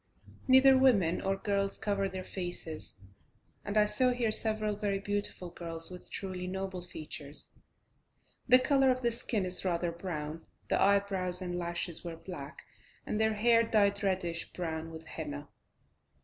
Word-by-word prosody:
Neither 265 Hz, +1 st, +8 dB
women 200 Hz, -11 st, +4 dB
or 195 Hz, 0 st, +1 dB
girls 200 Hz, 0 st, -1 dB
cover 200 Hz, -2 st, 0 dB
their 185 Hz, 0 st, -5 dB
faces, 175 Hz, -, -5 dB, 0.6 s
and 205 Hz, +1 st, -2 dB
I 210 Hz, -, +6 dB
saw 255 Hz, +4 st, +3 dB
here 245 Hz, -3 st, +1 dB
several 215 Hz, -1 st, 0 dB
very 200 Hz, -1 st, -1 dB
beautiful 200 Hz, -3 st, -3 dB
girls 165 Hz, 0 st, -3 dB
with 180 Hz, 0 st, -9 dB
truly 185 Hz, -2 st, -4 dB
noble 190 Hz, -1 st, -4 dB
features. 155 Hz, -4 st, -8 dB, 0.9 s
The 250 Hz, 0 st, +9 dB
colour 270 Hz, +1 st, +3 dB
of 255 Hz, 0 st, +1 dB
the 235 Hz, -, +3 dB
skin 225 Hz, -3 st, 0 dB
is 180 Hz, 0 st, -2 dB
rather 175 Hz, -2 st, 0 dB
brown, 165 Hz, -2 st, -5 dB, 0.3 s
the -, -, +2 dB
eyebrows 195 Hz, -3 st, +2 dB
and 180 Hz, -2 st, -3 dB
lashes 170 Hz, -1 st, -1 dB
were 170 Hz, -2 st, -6 dB
black, 160 Hz, -4 st, -8 dB, 0.4 s
and 210 Hz, -, -1 dB
the 220 Hz, 0 st, +3 dB
hair 230 Hz, +2 st, +5 dB
dyed 205 Hz, -3 st, +2 dB
reddish 180 Hz, -4 st, -1 dB
brown 165 Hz, -2 st, -3 dB
with 160 Hz, 0 st, -9 dB
henna. 70 Hz, -, -6 dB
190 Hz, 150 wpm, -31 LUFS, 170-210 Hz, 0.9 s, The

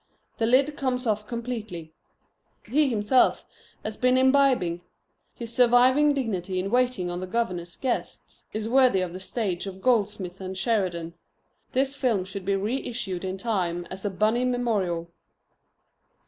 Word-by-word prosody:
The 225 Hz, -, +2 dB
lid 275 Hz, +5 st, +3 dB
comes 255 Hz, -1 st, -1 dB
off 210 Hz, -2 st, -1 dB
completely. 220 Hz, -9 st, -5 dB, 0.7 s
He 280 Hz, +5 st, +2 dB
himself 230 Hz, +2 st, +2 dB, 0.4 s
has 215 Hz, 0 st, -5 dB
been 250 Hz, 0 st, +3 dB
imbibing. 260 Hz, -10 st, +3 dB, 0.5 s
His 235 Hz, -1 st, -7 dB
surviving 255 Hz, +4 st, +5 dB
dignity 195 Hz, -8 st, -2 dB
in 190 Hz, +2 st, -2 dB
waiting 245 Hz, -8 st, +1 dB
on 175 Hz, -, -4 dB
the 185 Hz, -, -5 dB
governor's 180 Hz, -5 st, -2 dB
guests 255 Hz, -3 st, -4 dB
is 215 Hz, 0 st, -3 dB
worthy 250 Hz, -5 st, +4 dB
of 180 Hz, -2 st, -3 dB
the 185 Hz, -, -6 dB
stage 190 Hz, -2 st, -3 dB
of 190 Hz, -1 st, -7 dB
Goldsmith 200 Hz, -5 st, 0 dB
and 190 Hz, 0 st, -5 dB
Sheridan. 185 Hz, -7 st, -1 dB, 0.6 s
This 270 Hz, +2 st, +1 dB
film 230 Hz, -9 st, 0 dB
should 190 Hz, 0 st, -7 dB
be 200 Hz, 0 st, +1 dB
reissued 210 Hz, -3 st, -3 dB
in 190 Hz, 0 st, -3 dB
time 180 Hz, -5 st, -1 dB
as 190 Hz, 0 st, -7 dB
a 205 Hz, -, 0 dB
Bunny 215 Hz, +5 st, +1 dB
memorial. 205 Hz, -9 st, -1 dB
215 Hz, 145 wpm, -26 LUFS, 185-250 Hz, 0.7 s, surviving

